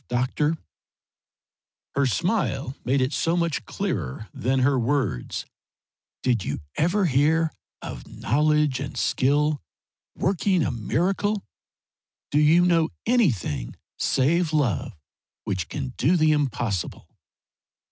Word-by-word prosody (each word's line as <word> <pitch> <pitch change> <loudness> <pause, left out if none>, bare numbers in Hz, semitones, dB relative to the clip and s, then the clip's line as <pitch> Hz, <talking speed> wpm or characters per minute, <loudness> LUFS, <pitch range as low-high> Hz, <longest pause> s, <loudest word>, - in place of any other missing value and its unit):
Doctor" 130 +6 0 1.4
her 140 -1 +2
smile 135 - 0
made 130 +2 +2
it 130 +3 0
so 165 +1 +1
much 170 -3 -1
clearer 110 - -3
than 130 +2 0
her 135 0 +3
words 120 - -1 0.8
"did 120 -6 +2
you 70 - -3 0.2
ever 180 +6 +2
hear 160 +2 +3 0.3
of - - -7
knowledge 150 +1 +1
and 140 0 -5
skill 145 +2 +2 0.5
working 185 -1 +1
a - - 0
miracle? 190 - 0 0.9
Do 145 - +3
you 160 +4 +5
know 165 -2 +3 0.2
anything 120 - +1 0.2
save 160 +5 +2
love 125 - 0 0.5
which 90 -4 -3
can 135 -3 -4
do 165 +8 +3
the 155 -1 +4
impossible?" 120 - -1
145 Hz, 110 wpm, -25 LUFS, 125-165 Hz, 1.4 s, you